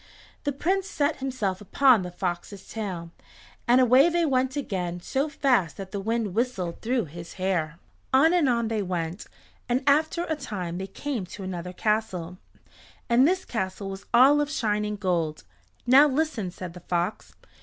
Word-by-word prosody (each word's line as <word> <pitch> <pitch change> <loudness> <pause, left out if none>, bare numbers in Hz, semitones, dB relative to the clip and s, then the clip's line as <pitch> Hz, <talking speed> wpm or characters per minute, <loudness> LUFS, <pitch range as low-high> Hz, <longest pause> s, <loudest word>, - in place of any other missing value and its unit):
The 285 - +1
Prince 375 +8 -1
set 290 -5 0
himself 225 -8 -2
upon 245 +2 +4
the 180 - -5
fox's 180 +2 -5
tail, 185 -7 -5 0.6
and 245 +2 +6
away 255 +5 +6
they 340 0 +1
went 260 -2 +1
again 180 -10 -3
so 270 - -1
fast 250 - +1
that 195 -1 -7
the 200 - -3
wind 220 -1 -1
whistled 200 -7 -2
through 240 0 0
his 170 +2 -10
hair. 175 -4 -1 0.3
On 310 +6 +5
and 335 -7 +3
on 235 -2 +1
they 220 -1 -1
went, 180 0 -3 0.4
and 250 +3 +1
after 310 +4 +3
a 320 -2 -2
time 185 - -5
they 190 - -4
came 230 -1 -4
to 195 +3 -9
another 180 -1 -5
castle, 185 -4 -2 0.7
and 250 +4 +6
this 370 +2 0
castle 195 -2 -3
was 195 +1 -9
all 270 +5 +6
of 295 - -1
shining 210 -6 -1
gold. 175 -6 -1 0.4
"Now 270 +4 +7
listen," 275 - -1
said 180 -1 -8
the 180 - -10
fox. 175 +3 -3
215 Hz, 165 wpm, -26 LUFS, 185-270 Hz, 0.7 s, Now